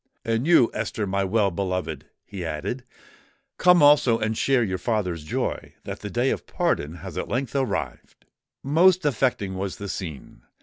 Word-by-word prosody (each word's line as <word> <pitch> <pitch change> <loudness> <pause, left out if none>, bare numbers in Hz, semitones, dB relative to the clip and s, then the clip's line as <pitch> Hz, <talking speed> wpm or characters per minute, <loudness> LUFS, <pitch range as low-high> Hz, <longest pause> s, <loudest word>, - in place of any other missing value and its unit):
"And 115 +5 0
you, 165 -9 +5
Esther, 110 0 -2
my 100 0 0
well 100 0 +2
beloved," 90 -5 -3 0.2
he 100 -3 -7
added, 80 - -4 0.8
"come 180 -3 +6
also 145 -5 +6
and 110 -1 -1
share 130 +1 +2
your 95 -3 -2
father's 90 -7 -1
joy 75 - -3
that - - -6
the - - -6
day - - +1
of - - -4
pardon 75 +3 -1
has - - -5
at - - -4
length 125 +1 -2
arrived!" 130 -7 -3 0.4
Most 170 +5 +4
affecting 120 -7 0
was 95 0 -3
the 100 - -7
scene. 80 -10 -7
110 Hz, 165 wpm, -24 LUFS, 95-135 Hz, 0.8 s, come